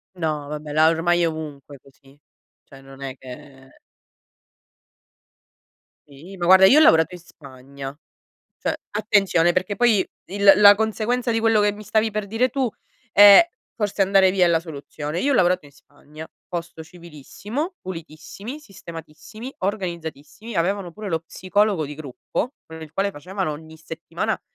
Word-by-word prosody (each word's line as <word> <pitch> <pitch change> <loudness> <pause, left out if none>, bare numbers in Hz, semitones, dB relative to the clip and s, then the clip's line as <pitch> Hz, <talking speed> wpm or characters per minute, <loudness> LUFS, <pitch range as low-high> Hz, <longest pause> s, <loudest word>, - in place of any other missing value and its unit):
No, 155 -4 -3
vabbè, 150 0 -6
la 155 +1 +4
ormai 175 +1 +1
è 170 - +3
ovunque 150 -3 -7
così, 135 +1 -23 0.4
cioè 135 -1 -16
non 135 0 -15
è 135 -1 -6
che 135 - -14 2.3
Sì, 165 +8 -13
ma, 175 - -3
guarda, 190 +1 +7
io 270 +10 +7
ho - - +6
lavorato 160 - +4
in 180 - -10
Spagna, 140 -2 -11 0.6
cioè - - -2
attenzione, 195 -5 +2
perché 185 +3 -1
poi 220 -3 +3 0.2
il 200 0 +5
la 205 0 +8
conseguenza 220 +3 -1
di 225 - 0
quello 225 -1 +3
che 205 0 +2
mi 210 +1 -11
stavi 220 +1 0
per 210 -1 -4
dire 225 +5 0
tu 260 0 -1 0.4
è: 205 +9 +9 0.3
forse 205 -2 -1
andare 195 -1 +4
via 185 -1 +2
è 175 - +3
la 165 -1 +2
soluzione; 155 0 -6
io 285 +1 +1
ho - - +2
lavorato 180 -5 +2
in 140 - -18
Spagna, 150 +2 -14 0.2
posto 165 -2 -6
civilissimo, 180 - -7
pulitissimi, 185 - -9
sistematissimi, 190 - -11
organizzatissimi, 185 +1 -5
avevano 185 +1 -1
pure 210 +2 -7
lo 165 -2 -1
psicologo 185 0 0
di 150 - -7
gruppo, 155 - -5
con 160 0 -11
il 160 -1 -11
quale 200 +1 -1
facevano 185 +3 -4
ogni 160 +1 -11
settimana 160 0 -5
175 Hz, 155 wpm, -22 LUFS, 155-205 Hz, 2.3 s, è